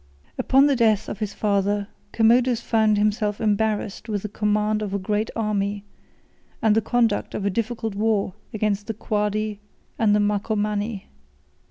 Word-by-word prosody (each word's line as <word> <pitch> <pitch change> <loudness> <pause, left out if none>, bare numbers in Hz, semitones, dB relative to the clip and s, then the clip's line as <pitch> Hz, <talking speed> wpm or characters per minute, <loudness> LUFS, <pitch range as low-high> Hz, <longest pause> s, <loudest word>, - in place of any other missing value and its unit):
] 75 - -34
Upon 270 +1 +4
the 285 -1 +3
death 220 -4 +2
of - - -6
his 210 -2 -4
father, 205 -1 0 0.2
Commodus 235 +1 +3
found 220 -2 +2
himself 210 0 0
embarrassed 215 0 -1
with 205 -2 -2
the 210 - -4
command 210 +1 0
of 200 -2 -3
a - - +2
great 210 +3 -1
army, 205 -2 -1 0.7
and 220 -1 +3
the 225 - +3
conduct 230 -2 0
of 200 - -3
a 200 - +1
difficult 225 +1 -2
war 205 -2 0 0.2
against 205 -1 -1
the 225 - -3
Quadi 210 -1 -1 0.4
and 210 -2 +4
Marcomanni. 210 0 -1
210 Hz, 155 wpm, -23 LUFS, 205-220 Hz, 0.7 s, Upon